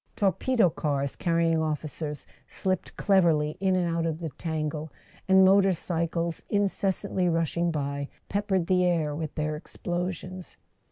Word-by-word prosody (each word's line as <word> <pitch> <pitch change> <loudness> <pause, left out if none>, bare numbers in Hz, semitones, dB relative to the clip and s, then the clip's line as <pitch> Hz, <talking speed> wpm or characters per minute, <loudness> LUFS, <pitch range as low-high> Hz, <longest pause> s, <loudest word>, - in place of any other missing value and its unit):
Torpedo 200 +1 +2
cars 140 -3 -1
carrying 165 -2 +2
officers 155 -1 -3 0.2
slipped 185 -2 -2
cleverly 165 -6 +3
in 190 -1 +2
and 180 -1 +1
out 165 0 0
of 160 -1 -2
the 165 -3 -4
tangle, 155 0 -3 0.4
and 190 0 +7
motor 195 0 +5
cycles, 170 0 -2
incessantly 195 -2 +1
rushing 165 +1 +1
by, 140 -2 -2 0.2
peppered 200 -3 0
the 180 0 +3
air 165 -4 +1
with 155 -1 -5
their 155 -1 -1
explosions. 180 +3 -4
170 Hz, 130 wpm, -27 LUFS, 155-185 Hz, 0.4 s, and